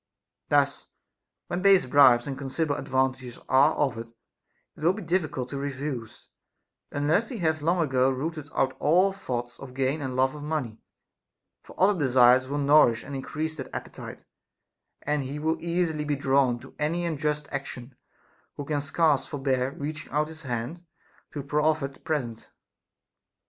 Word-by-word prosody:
Thus, -, -, +2 dB, 0.6 s
when 175 Hz, -, -3 dB
base 195 Hz, -3 st, +5 dB
bribes 125 Hz, -3 st, +6 dB
and 140 Hz, -, -4 dB
considerable 145 Hz, +3 st, -2 dB
advantages 130 Hz, -2 st, -1 dB
are 140 Hz, +4 st, +4 dB
offered, 120 Hz, -5 st, -1 dB, 0.7 s
it -, -, -15 dB
will 175 Hz, +3 st, +4 dB
be 210 Hz, +1 st, -7 dB
difficult 160 Hz, -7 st, -1 dB
to 140 Hz, -, -4 dB
refuse, 135 Hz, -4 st, -5 dB, 0.6 s
unless 155 Hz, +10 st, +1 dB
he 245 Hz, -, -5 dB
hath 160 Hz, -4 st, 0 dB
long 170 Hz, +4 st, +1 dB
ago 130 Hz, -3 st, +2 dB
rooted 145 Hz, +3 st, -4 dB
out 130 Hz, 0 st, +1 dB
all 180 Hz, +6 st, +3 dB
thoughts 120 Hz, -10 st, -5 dB
of 130 Hz, -2 st, -10 dB
gain 135 Hz, +3 st, 0 dB
and 130 Hz, -2 st, -4 dB
love 130 Hz, +1 st, +2 dB
of 150 Hz, -, -9 dB
money; 145 Hz, -7 st, -3 dB, 0.8 s
for -, -, -15 dB
other 190 Hz, 0 st, +4 dB
desires 130 Hz, -2 st, +5 dB
will 145 Hz, +2 st, -3 dB
nourish 140 Hz, -5 st, +4 dB
and 140 Hz, -, -8 dB
increase 155 Hz, +4 st, -4 dB
that 130 Hz, -, -6 dB
appetite, -, -, -8 dB, 0.8 s
and 150 Hz, 0 st, 0 dB
he 135 Hz, +2 st, -5 dB
will 160 Hz, +2 st, -1 dB
easily 170 Hz, -3 st, -1 dB
be 150 Hz, -1 st, -1 dB
drawn 135 Hz, -2 st, +2 dB
to -, -, -14 dB
any 165 Hz, +4 st, 0 dB
unjust 150 Hz, -2 st, -2 dB
action 135 Hz, -2 st, -6 dB, 0.6 s
who 145 Hz, -, -6 dB
can 145 Hz, 0 st, -1 dB
scarce 145 Hz, 0 st, +1 dB
for 145 Hz, -, -5 dB
bear 130 Hz, -2 st, 0 dB
reaching 155 Hz, +1 st, -6 dB
out 150 Hz, +2 st, 0 dB
his 160 Hz, 0 st, -10 dB
hand 125 Hz, +5 st, -4 dB, 0.5 s
to 145 Hz, -, -5 dB
a -, -, -11 dB
proffered 150 Hz, -1 st, 0 dB
present. 125 Hz, -8 st, -3 dB
145 Hz, 160 wpm, -26 LUFS, 130-155 Hz, 0.8 s, bribes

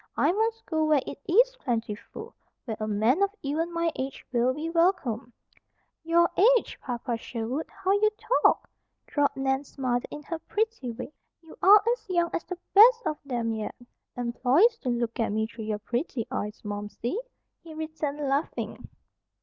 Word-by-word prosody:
I -, -, +4 dB
must 450 Hz, +3 st, -1 dB
go 315 Hz, -3 st, 0 dB
where 300 Hz, -3 st, +3 dB
it 280 Hz, -, -7 dB
is -, -, +5 dB
plentiful, 235 Hz, -, -4 dB, 0.3 s
where 225 Hz, -3 st, -3 dB
a 215 Hz, -, -2 dB
man 220 Hz, -, +2 dB
of 400 Hz, -, +4 dB
even 315 Hz, +5 st, -1 dB
my 335 Hz, 0 st, 0 dB
age 265 Hz, +1 st, -5 dB
will 245 Hz, 0 st, +2 dB
be 300 Hz, +5 st, -4 dB
welcome." 330 Hz, -, +1 dB, 0.7 s
"Your 340 Hz, +1 st, +4 dB, 0.3 s
age, -, -, -6 dB
Papa 240 Hz, -2 st, -3 dB
Sherwood! 235 Hz, +6 st, -4 dB
How 385 Hz, -1 st, -2 dB
you 415 Hz, +2 st, +4 dB, 0.3 s
talk," -, -, +4 dB, 0.4 s
drawled 290 Hz, -1 st, +1 dB
Nan's 270 Hz, +1 st, -2 dB
mother 245 Hz, -2 st, 0 dB
in 295 Hz, -, -8 dB
her 330 Hz, +2 st, -5 dB
pretty 435 Hz, -, -2 dB
way. 250 Hz, +6 st, -8 dB, 0.3 s
"You 325 Hz, -, -13 dB
are 410 Hz, +2 st, +8 dB
as 485 Hz, -4 st, -10 dB
young 345 Hz, -2 st, +1 dB
as -, -, -1 dB
the 365 Hz, -, -5 dB, 0.2 s
best 465 Hz, +3 st, +7 dB
of 305 Hz, -, -1 dB
'em 235 Hz, -3 st, -1 dB
yet." 220 Hz, -1 st, -4 dB, 0.4 s
"Employers 255 Hz, -, +3 dB
don't 245 Hz, -2 st, 0 dB
look 235 Hz, -1 st, -3 dB
at 225 Hz, -, +1 dB
me 220 Hz, +1 st, 0 dB
through 225 Hz, 0 st, -8 dB
your 215 Hz, -1 st, -1 dB
pretty 235 Hz, +2 st, -3 dB
eyes, 210 Hz, +1 st, -3 dB
Momsey," 210 Hz, -, -4 dB, 0.4 s
he 325 Hz, -2 st, -11 dB
returned, 305 Hz, -2 st, -3 dB
laughing. 275 Hz, +3 st, -2 dB
280 Hz, 165 wpm, -27 LUFS, 235-340 Hz, 0.7 s, are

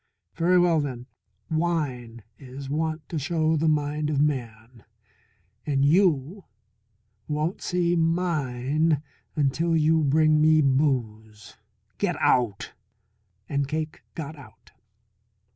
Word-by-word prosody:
Very 175 Hz, +2 st, +2 dB
well, 175 Hz, -2 st, +4 dB
then, 130 Hz, -4 st, -4 dB, 0.5 s
wine 140 Hz, -9 st, -2 dB, 0.2 s
is 135 Hz, +1 st, -9 dB
wont 160 Hz, +1 st, -2 dB
to 160 Hz, -, -3 dB
show 160 Hz, +2 st, 0 dB
the 160 Hz, +1 st, +1 dB
mind 150 Hz, 0 st, 0 dB
of 145 Hz, -2 st, 0 dB
man, 120 Hz, -5 st, -3 dB, 0.8 s
and 140 Hz, -2 st, +1 dB
you 170 Hz, +2 st, +2 dB, 0.8 s
won't 155 Hz, +4 st, -2 dB
see 175 Hz, -1 st, 0 dB
mine 155 Hz, -3 st, 0 dB, 0.3 s
until 160 Hz, +3 st, +1 dB
you 160 Hz, 0 st, +3 dB
bring 155 Hz, +2 st, +3 dB
me 155 Hz, 0 st, +5 dB
booze. 115 Hz, -7 st, -1 dB, 0.4 s
Get 185 Hz, -4 st, 0 dB
out!" 120 Hz, -6 st, +1 dB, 0.7 s
And 140 Hz, -1 st, -1 dB
Cake 155 Hz, +1 st, -4 dB
got 155 Hz, -1 st, -6 dB
out. 130 Hz, -7 st, -17 dB
150 Hz, 110 wpm, -25 LUFS, 135-160 Hz, 0.8 s, me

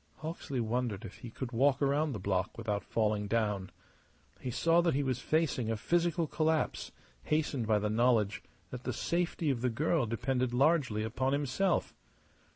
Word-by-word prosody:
Hawksley 155 Hz, -4 st, -5 dB
wondered 115 Hz, -2 st, -1 dB
if 100 Hz, -, -10 dB
he 120 Hz, -, -8 dB
could 125 Hz, +2 st, -6 dB
walk 135 Hz, +3 st, +3 dB
round 145 Hz, 0 st, +1 dB
the -, -, -4 dB
block 95 Hz, +1 st, -1 dB
without 105 Hz, -4 st, -2 dB
falling 105 Hz, -2 st, 0 dB
down. 105 Hz, -4 st, 0 dB, 0.7 s
He 130 Hz, -, -4 dB
saw 165 Hz, +7 st, +3 dB
that 170 Hz, -4 st, +1 dB
he 145 Hz, -, +1 dB
was 130 Hz, -2 st, -1 dB
facing 140 Hz, -5 st, 0 dB
a 115 Hz, -, 0 dB
physical 170 Hz, +5 st, +1 dB
collapse, 155 Hz, +1 st, 0 dB, 0.3 s
hastened 145 Hz, -6 st, 0 dB
by 110 Hz, -1 st, +4 dB
the 105 Hz, +1 st, 0 dB
knowledge 110 Hz, -3 st, +2 dB, 0.3 s
that 125 Hz, -1 st, -6 dB
the 125 Hz, -, -2 dB
safety 170 Hz, +1 st, 0 dB
of 120 Hz, -3 st, -2 dB
the 125 Hz, -, +2 dB
girl 150 Hz, +2 st, +1 dB
depended 125 Hz, +2 st, -1 dB
largely 135 Hz, -6 st, +2 dB
upon 130 Hz, +5 st, -1 dB
himself. 145 Hz, +7 st, 0 dB
125 Hz, 165 wpm, -32 LUFS, 110-150 Hz, 0.7 s, by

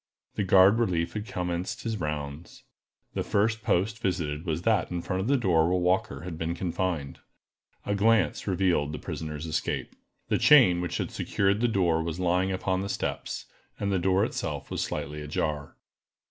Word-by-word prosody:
The 105 Hz, -, -1 dB
guard 95 Hz, +3 st, +6 dB
relief 85 Hz, -7 st, 0 dB
had 105 Hz, 0 st, -4 dB
commenced 90 Hz, +2 st, -3 dB
his 110 Hz, -2 st, -2 dB
rounds. 75 Hz, 0 st, -5 dB, 0.5 s
The -, -, -1 dB
first 110 Hz, +2 st, +1 dB
post 105 Hz, +4 st, 0 dB
visited 85 Hz, -5 st, -2 dB
was 80 Hz, +1 st, -1 dB
that 110 Hz, -6 st, +2 dB
in 85 Hz, -1 st, -3 dB
front 95 Hz, -1 st, -2 dB
of 100 Hz, -, -2 dB
the 140 Hz, +1 st, +3 dB
door 85 Hz, -9 st, +3 dB
where 90 Hz, -, +2 dB
Walker 90 Hz, -6 st, 0 dB
had 85 Hz, -1 st, -7 dB
been 80 Hz, +1 st, -2 dB
confined. 85 Hz, -5 st, -2 dB, 0.7 s
A 100 Hz, -, 0 dB
glance 110 Hz, +2 st, +2 dB
revealed 90 Hz, -6 st, +1 dB
the -, -, -3 dB
prisoner's 75 Hz, 0 st, -5 dB
escape. 80 Hz, -1 st, -2 dB, 0.3 s
The -, -, +2 dB
chain 115 Hz, -13 st, +6 dB
which 90 Hz, -, -2 dB
had -, -, -3 dB
secured 100 Hz, +2 st, 0 dB
the 120 Hz, -, +4 dB
door 90 Hz, -7 st, +2 dB
was 85 Hz, +1 st, -4 dB
lying 90 Hz, +1 st, +1 dB
upon 95 Hz, 0 st, -1 dB
the 100 Hz, -, -4 dB
steps, -, -, -3 dB, 0.3 s
and 100 Hz, -1 st, -1 dB
the 95 Hz, -, +2 dB
door 95 Hz, +2 st, +3 dB
itself -, -, -4 dB
was -, -, -2 dB
slightly 75 Hz, +1 st, -4 dB
ajar. 75 Hz, 0 st, -3 dB
90 Hz, 175 wpm, -27 LUFS, 80-100 Hz, 0.7 s, guard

